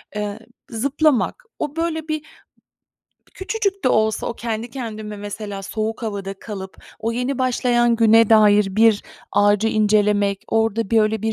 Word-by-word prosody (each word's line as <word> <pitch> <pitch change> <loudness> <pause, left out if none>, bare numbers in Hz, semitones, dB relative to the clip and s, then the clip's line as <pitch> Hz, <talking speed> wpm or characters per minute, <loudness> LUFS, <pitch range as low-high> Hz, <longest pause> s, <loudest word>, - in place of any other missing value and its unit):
Eee, 210 +1 -4 0.3
zıplamak, 280 - 0 0.2
o, 295 +1 -3
böyle, 325 -1 -2
bir 310 0 -3 1.1
küçücük 395 - -2
de - - +5
olsa, 220 -2 +1
o 235 - -3
kendi 230 0 -4
kendime 215 -5 -6
mesela 205 -1 -6
soğuk 220 +3 -4
havada 200 -3 -4
kalıp 195 -3 -8 0.2
o 225 +1 -2
yeni 250 +3 -2
başlayan 240 -2 +2
güne 225 0 +5
dair 210 -2 +6
bir 220 -2 +4 0.3
ağacı 205 +2 +3
incelemek, 210 -2 +2
orada 225 -1 0
bir 225 -1 +4
öyle 215 0 0
bir 220 0 0
225 Hz, 145 wpm, -21 LUFS, 210-245 Hz, 1.1 s, dair